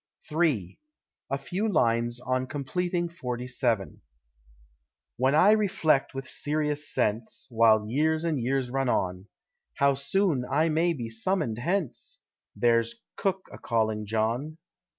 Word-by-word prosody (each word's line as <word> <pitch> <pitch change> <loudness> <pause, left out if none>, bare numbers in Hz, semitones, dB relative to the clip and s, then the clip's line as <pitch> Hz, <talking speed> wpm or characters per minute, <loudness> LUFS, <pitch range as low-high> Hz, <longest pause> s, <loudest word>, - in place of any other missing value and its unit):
III. 150 - 0 0.5
A 135 - 0
FEW 185 +10 -2
LINES 120 -5 +1
ON 130 +1 -1
COMPLETING 175 +6 -2
FORTY 125 -7 -5
SEVEN. 120 -5 -1 1.2
When 130 +3 +2
I 190 +6 +6
reflect 175 -11 +2
with 135 -1 -5
serious 150 +1 -1
sense, 110 +2 -1
While 110 -2 +4
years 155 +6 +1
and 160 -4 0
years 130 0 -1
run 135 -1 0
on, 90 -2 -1 0.5
How 140 0 +3
soon 140 +1 +1
I 155 +4 +2
may 165 +2 +2
be 120 -6 -6
summoned 120 - -1
hence 175 +1 -2 0.4
There's 120 - +2 0.2
cook 190 -2 -2
a - - -10
calling 110 -2 0
John. 115 +8 -1
135 Hz, 130 wpm, -27 LUFS, 115-160 Hz, 1.2 s, I